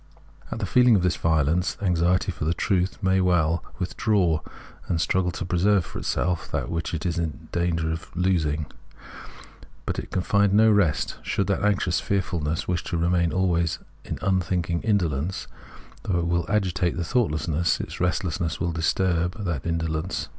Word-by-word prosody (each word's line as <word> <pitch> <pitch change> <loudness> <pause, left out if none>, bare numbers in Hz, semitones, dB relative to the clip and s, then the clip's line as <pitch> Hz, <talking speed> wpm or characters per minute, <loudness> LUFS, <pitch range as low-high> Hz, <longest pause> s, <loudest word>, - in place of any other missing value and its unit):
At - - -3
the - - -2
feeling 125 -2 +5
of 95 - +2
this 90 -4 +2
violence, 80 +4 +1
anxiety 90 0 +1
for 80 -3 -6
the 80 +3 0
truth 95 +1 0
may 95 0 +3
well 85 -2 +2
with 95 -2 -4
draw, 90 -8 +2 0.5
and 85 - 0
struggle 90 +2 +1
to 90 - -4
preserve 95 +1 +2
for - - -7
itself 90 -2 -1
that - - -2
which 85 0 -2
is 85 -1 0
in 80 -4 -4
danger 85 -2 0
of 80 +1 -6
being 80 -5 +1
lost. - - -20 1.1
But - - -2
it - - -7
can 90 - -1
find 100 0 +3
no 110 +1 +6
rest. 95 -8 +1
Should 100 - -1
that 100 +1 -1
anxious 100 -4 +2
fearfulness 85 -5 -1
wish 90 -2 -1
to 85 - -2
remain 85 0 +2
always 85 -3 +1 0.3
in - - -5
unthinking 90 -2 0
indolence, 90 - 0 0.6
thought 90 -4 0
will 85 0 0
agitate 95 -4 0
the 85 - -1
thoughtlessness, 85 - 0
its - - -6
restlessness 90 -2 -1
will 85 -2 0
disturb 90 +3 0
that 85 -4 -2
in 85 0 +1
dolence. 80 +2 -3
90 Hz, 170 wpm, -25 LUFS, 80-95 Hz, 1.1 s, no